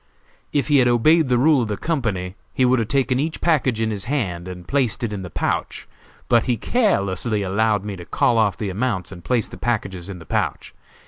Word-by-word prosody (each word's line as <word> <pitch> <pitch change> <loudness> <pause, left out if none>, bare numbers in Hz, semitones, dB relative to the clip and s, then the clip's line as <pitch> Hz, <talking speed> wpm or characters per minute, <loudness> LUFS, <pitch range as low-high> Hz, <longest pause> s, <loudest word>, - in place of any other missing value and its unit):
If 145 - 0
he 145 -2 +5
had 125 - +4
obeyed 145 +6 +4
the 125 - +3
rule 140 +1 +4
of 115 - -1
the 105 -1 -3
company 105 - -2 0.2
he 130 - +3
would 125 0 +3
have 115 - -1
taken 130 0 +1
each 155 +3 -2
package 135 -9 +1
in 110 0 0
his 100 -3 -3
hand 95 -11 -2
and 90 -1 -9
placed 130 -3 0
it 110 -3 -2
in 100 - -4
the 90 - -7
pouch, 80 - -2 0.4
but 120 -2 +3
he 120 -2 +1
carelessly 105 - 0
allowed 105 +1 +1
me 105 -2 -4
to 90 -2 -10
call 115 +5 +2
off 100 -3 +2
the 100 -3 -3
amounts 100 -3 -2
and 90 -3 -10
place 120 +1 0
the - - -11
packages 95 -6 -2
in 95 - -6
the 80 - -12
pouch. - - -2
110 Hz, 220 wpm, -22 LUFS, 95-130 Hz, 0.4 s, he